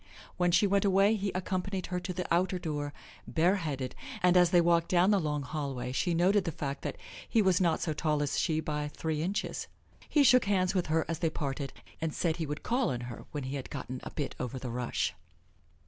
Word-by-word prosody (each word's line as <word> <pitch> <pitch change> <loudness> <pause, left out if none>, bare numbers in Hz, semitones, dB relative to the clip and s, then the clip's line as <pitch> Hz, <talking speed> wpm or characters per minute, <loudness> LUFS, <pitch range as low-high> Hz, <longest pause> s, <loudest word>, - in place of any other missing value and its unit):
When 180 0 +2
she 180 +4 +4
went 200 0 +2
away, 200 +2 +4
he 200 -2 -2
accompanied 185 0 -2
her 180 - +1
to 185 - -4
the 180 0 -3
outer 185 +2 +2
door, 150 -4 -3 0.4
bareheaded, 160 -7 0 0.3
and 180 0 +5
as 180 -1 +6
they 175 -1 +5
walked 170 0 +3
down 180 +2 +4
the 200 - +4
long 150 -3 -1
hallway 130 -3 -4
she 170 +6 0
noted 190 +4 +4
the 165 - -2
fact 140 -2 -4
that - - -4 0.3
he 230 - +3
was 190 -3 +4
not 170 -3 +2
so 160 - 0
tall 150 -1 0
as 145 - -1
she 155 -3 +1
by 150 -1 -2
three 155 +1 -3
inches. 190 +5 -2 0.4
He 295 - +4
shook 250 -3 +6
hands 190 -2 +2
with 185 -3 0
her 160 +1 +1
as 165 -1 -3
they 165 - +1
parted, 140 -3 -3 0.3
and 160 -2 -2
said 165 -2 0
he 160 -3 -2
would 150 +1 -5
call 245 +1 +1
on 125 -1 -2
her 120 -2 -7
when 145 -2 -4
he 130 +2 -3
had 135 - -7
gotten 130 0 -5
a - - -6
bit 145 -3 -3
over 125 +1 -3
the 125 -2 -5
rush. 120 -6 -1
165 Hz, 225 wpm, -30 LUFS, 145-185 Hz, 0.4 s, as